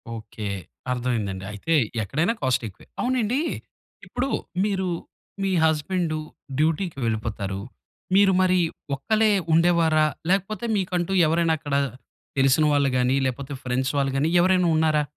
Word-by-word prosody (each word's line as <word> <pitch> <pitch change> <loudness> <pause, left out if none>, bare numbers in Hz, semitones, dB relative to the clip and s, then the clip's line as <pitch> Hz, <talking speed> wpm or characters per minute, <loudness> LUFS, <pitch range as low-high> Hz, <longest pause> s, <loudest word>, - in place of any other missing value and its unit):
Okay 110 -1 -7 0.4
అర్థమైందండి. 115 -7 -2
అయితే 105 +11 -2 0.3
ఎక్కడైనా 155 - 0
కాస్ట్ 130 -3 +1
ఎక్కువే. 100 - -14
అవునండి 250 0 +1 0.7
ఇప్పుడు 265 +2 -2 0.4
మీరు 190 -3 -1 0.6
మీ 195 - +1
హస్బెండు 160 +1 +1 0.4
డ్యూటీకి 160 +1 0
వెళ్ళిపోతారు. 105 -3 -2 0.6
మీరు 200 0 +6
మరి 185 -1 +3 0.4
ఒక్కలే 215 +10 +2 0.2
ఉండేవారా? 165 -2 +4 0.2
లేకపోతే 200 +5 0
మీకంటూ 180 -1 -1 0.2
ఎవరైనా 165 +1 +2
అక్కడ 145 -2 -3 0.6
తెలిసిన 135 +3 +4
వాళ్ళు 140 -1 +3
గాని 125 +1 +2
లేకపోతే 135 +2 -3
ఫ్రెండ్స్ 130 +1 0
వాళ్ళు 135 -1 +1
గాని 150 +4 +2
ఎవరైనా 180 0 +3
ఉన్నారా? 155 -1 +3
155 Hz, 120 wpm, -24 LUFS, 130-185 Hz, 0.7 s, మీరు